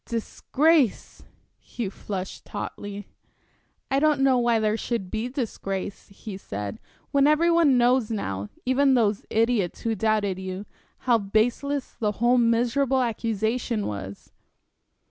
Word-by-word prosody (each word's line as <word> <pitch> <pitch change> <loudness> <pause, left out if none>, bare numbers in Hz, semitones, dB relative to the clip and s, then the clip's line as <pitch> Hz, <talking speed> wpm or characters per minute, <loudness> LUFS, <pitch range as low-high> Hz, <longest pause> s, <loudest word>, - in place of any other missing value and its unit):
"Disgrace!" 270 - +1 0.4
He 235 -4 -5
flushed 190 -1 -6
hotly. 205 -1 -6 0.8
"I 270 - +3
don't 300 -1 +3
know 265 -2 +4
why 240 -1 +3
there 215 -1 +1
should 225 -5 -3
be 225 +3 -2
disgrace," 200 -7 -4
he 195 0 -9
said, 100 - -6 0.3
"when 280 0 +4
every 320 +3 +4
one 325 -6 +4
knows 245 -1 +3
now 100 - -3 0.2
even 265 +1 +3
those 215 -4 +1
idiots 225 -5 +1
who 230 - 0
doubted 210 -3 0
you 190 +1 -5 0.4
how 240 -3 +4
baseless 240 +7 -1
the 210 -3 0
whole 240 +3 +3
miserable 245 +3 +2
accusation 225 0 -1
was." 100 -1 -6
230 Hz, 125 wpm, -25 LUFS, 200-255 Hz, 0.8 s, know